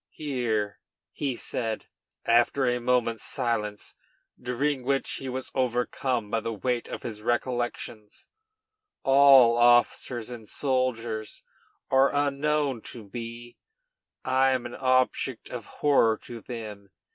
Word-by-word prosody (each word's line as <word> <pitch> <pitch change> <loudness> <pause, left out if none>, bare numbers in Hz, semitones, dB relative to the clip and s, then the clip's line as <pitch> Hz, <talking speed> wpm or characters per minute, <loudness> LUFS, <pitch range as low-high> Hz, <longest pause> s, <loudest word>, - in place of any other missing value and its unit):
Here," 120 -8 -2 0.3
he 135 -4 -2
said, 115 -3 -3 0.4
after 120 +3 +3
a 125 0 +1
moment's 120 -2 +1
silence, 105 -5 -2 0.5
during 130 +2 -1
which 135 +1 0
he 135 - -5
was 130 +1 -5
overcome 125 -2 -1
by 115 - +1
the 115 +1 -4
weight 125 +2 -1
of - - -7
his 110 -3 -6
recollections, 120 -2 -3 0.8
"all, 135 -4 +7
officers 120 0 +3
and 115 -3 -9
soldiers, 120 -5 -2 0.5
are 135 +1 +5
unknown 145 -2 +1
to 105 -5 -9
me; 120 0 -7 0.7
I 130 +1 +3
am 130 -2 0
an 120 - -6
object 130 -1 0
of 120 -4 -6
horror 115 -7 +3
to 120 -2 -8
them. 105 -5 -8
120 Hz, 120 wpm, -27 LUFS, 115-130 Hz, 0.8 s, all